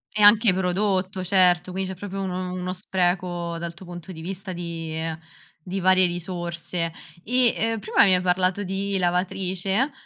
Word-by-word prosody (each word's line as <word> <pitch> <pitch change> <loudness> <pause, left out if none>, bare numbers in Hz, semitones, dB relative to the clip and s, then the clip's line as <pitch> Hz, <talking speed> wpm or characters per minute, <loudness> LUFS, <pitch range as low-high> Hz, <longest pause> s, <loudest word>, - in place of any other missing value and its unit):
E 210 - 0
anche 210 -1 +7
prodotto, 185 0 0
certo, 180 -1 +4
quindi 190 0 -3
c'è - - -6
proprio 195 +1 -6
uno 185 -1 -3
uno 180 0 -3
spreco 175 -2 -1
dal 170 0 -5
tuo 180 +2 -13
punto 175 +1 -9
di 160 - -9
vista 190 +2 -5
di 170 -2 -5
ehm, 160 0 -3 0.5
di 190 +2 -4
varie 185 0 +5
risorse. 175 -1 -3 0.3
E, 250 +1 +3
ehm, 225 0 -1
prima 215 +2 +3
mi 190 -2 +5
hai 180 - +1
parlato 185 +2 +1
di 195 +1 -2
lavatrice 185 - 0
185 Hz, 165 wpm, -24 LUFS, 175-195 Hz, 0.5 s, anche